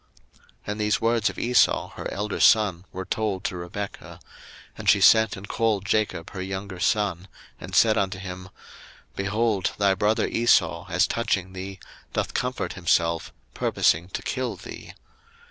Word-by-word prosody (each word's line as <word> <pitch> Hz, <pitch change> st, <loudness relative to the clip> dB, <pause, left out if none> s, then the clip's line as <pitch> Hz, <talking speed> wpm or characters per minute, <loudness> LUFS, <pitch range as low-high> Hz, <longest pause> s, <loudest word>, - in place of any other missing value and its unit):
01:027:042 -, -, -30 dB, 0.2 s
And 105 Hz, +1 st, -3 dB
these 105 Hz, 0 st, +1 dB
words 115 Hz, -1 st, +2 dB
of -, -, -9 dB
Esau 125 Hz, +1 st, +2 dB
her -, -, -7 dB
elder 105 Hz, +1 st, -3 dB
son 100 Hz, -5 st, +4 dB
were 95 Hz, +1 st, -6 dB
told 105 Hz, -3 st, -2 dB
to 95 Hz, -, -2 dB
Rebekah: 90 Hz, +3 st, -7 dB, 0.6 s
and -, -, -1 dB
she -, -, +6 dB
sent 110 Hz, -2 st, +5 dB
and 100 Hz, +1 st, -9 dB
called 110 Hz, -4 st, 0 dB
Jacob 95 Hz, -5 st, -1 dB
her 95 Hz, -, -6 dB
younger 95 Hz, 0 st, -5 dB
son, 95 Hz, -3 st, 0 dB, 0.3 s
and 90 Hz, +3 st, -7 dB
said 110 Hz, +2 st, +5 dB
unto 95 Hz, 0 st, -1 dB
him, 95 Hz, 0 st, -8 dB, 0.7 s
Behold, 105 Hz, 0 st, 0 dB
thy 100 Hz, -1 st, +3 dB
brother 105 Hz, +3 st, +1 dB
Esau, 90 Hz, -6 st, +2 dB
as 90 Hz, 0 st, +3 dB
touching 95 Hz, -5 st, -1 dB
thee, 95 Hz, +1 st, -7 dB, 0.3 s
doth -, -, -2 dB
comfort -, -, -2 dB
himself, 85 Hz, -1 st, 0 dB, 0.2 s
purposing 85 Hz, +2 st, +1 dB
to -, -, -5 dB
kill 130 Hz, -2 st, -2 dB
thee. -, -, -10 dB
100 Hz, 155 wpm, -25 LUFS, 95-110 Hz, 0.7 s, she